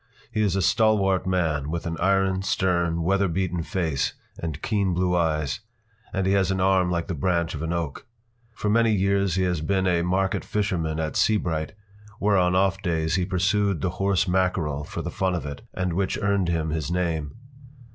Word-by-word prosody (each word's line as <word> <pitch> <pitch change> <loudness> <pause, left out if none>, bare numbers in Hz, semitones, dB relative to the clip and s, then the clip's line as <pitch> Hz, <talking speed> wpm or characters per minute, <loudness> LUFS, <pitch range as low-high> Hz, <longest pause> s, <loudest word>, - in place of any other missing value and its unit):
He 110 -2 0
is 100 -3 +1
a 95 - +1
stalwart 100 -4 +2
man, 80 -6 0
with 85 +1 -3
an 85 0 -2
iron, 95 0 +2
stern, 85 -3 0
weather 100 +3 +2
beaten 90 0 -1
face 80 -6 -1 0.3
and 80 -3 -4
keen 100 -5 +1
blue 90 0 +1
eyes, 75 -4 0 0.5
and 95 -1 -1
he 95 - +2
has 95 -2 +2
an 95 -1 0
arm 95 -1 +3
like 85 -1 -1
the 95 - -4
branch 85 +1 0
of 75 - -5
an 80 +1 -2
oak. 85 -4 -3 0.5
For 105 - -3
many 115 +2 +3
years 100 -1 +1
he 95 - +1
has 90 -4 0
been 95 +3 0
a 90 -2 +2
market 95 +2 0
fisherman 85 -7 -1
at 80 -1 -2
Seabright, 85 -8 +1 0.4
where 105 0 +2
on 90 -1 +3
off 95 +1 +2
days 80 -3 0
he 95 -1 +1
pursued 100 -1 +1
the 90 - 0
horse 95 -2 +2
mackerel 90 -5 0
for - - -6
the - - -4
fun 95 -1 0
of 85 - -4
it, 70 -1 -6
and 90 -2 -2
which 95 +2 0
earned 100 -4 +1
him 80 -2 -1
his 80 -2 -2
name. 85 -5 -1
90 Hz, 195 wpm, -25 LUFS, 80-95 Hz, 0.5 s, arm